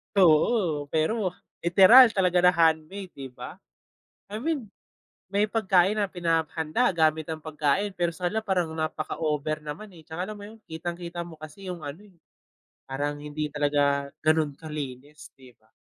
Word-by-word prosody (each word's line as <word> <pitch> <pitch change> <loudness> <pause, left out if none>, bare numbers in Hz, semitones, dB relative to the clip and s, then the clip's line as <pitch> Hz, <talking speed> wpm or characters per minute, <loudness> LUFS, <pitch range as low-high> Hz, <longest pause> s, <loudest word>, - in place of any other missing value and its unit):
Oo, 165 -3 +3
pero, 180 +5 0 0.3
literal 195 +9 +8
talaga 180 -2 +3
na 180 0 +5
handmade, 165 +3 +1
'di 135 -1 -8
ba? 125 +9 -9 0.7
I 215 - -4
mean, 280 -7 -2 0.6
may 205 +2 +2
pagkain 195 -2 +3
na 200 -2 0
pinapa-handa 165 +4 0
gamit 160 -1 +2
ang 160 - -5
pagkain, 155 +6 -1
pero 175 -1 0
sana 185 +6 -2
parang 180 -5 0
napaka-over 155 -1 -2
naman 155 +8 -7
eh, 160 - -14
tsaka 175 +4 -5
alam 215 - -6
mo 205 - -10
yun, 220 +1 -13
kitang-kita 170 +1 -5
mo 160 -3 -12
kasi 180 +5 -8
yung 170 -3 -8
ano 155 +8 -8
eh, 185 -4 -22 0.7
parang 145 +2 -3
hindi 150 +1 -4
talaga 145 -1 +1 0.2
ganun 155 -2 +2
kalinis, 150 -2 -8
'di 130 -2 -16
ba? 110 - -32
165 Hz, 150 wpm, -26 LUFS, 150-190 Hz, 0.7 s, literal